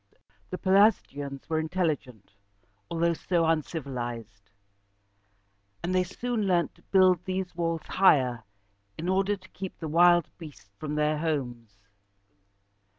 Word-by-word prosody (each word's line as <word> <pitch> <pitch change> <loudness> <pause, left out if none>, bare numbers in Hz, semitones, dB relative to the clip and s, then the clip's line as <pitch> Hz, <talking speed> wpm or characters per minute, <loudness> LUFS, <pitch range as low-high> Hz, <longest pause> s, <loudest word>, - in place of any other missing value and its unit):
The 185 - -4
Pelasgians 185 -9 +2
were 160 -1 0
intelligent, 155 - -3 0.6
although 170 0 +1
so 170 0 0
uncivilized; 120 - -3 1.3
and 180 - -1
they 185 0 +3
soon 225 +3 -3
learned 175 -2 +1
to - - -25
build 185 -3 +3
these 185 -1 -3
walls 165 -2 -2
higher, 130 - +3 0.5
in 165 - -4
order 195 +2 +1
to 185 0 -18
keep 190 -1 -7
the 160 - -5
wild 175 +1 +5
beasts 150 - -12
away 100 - -45
from 150 -1 -4
their 150 0 +1
homes. 120 -9 -3
165 Hz, 125 wpm, -27 LUFS, 140-185 Hz, 1.3 s, wild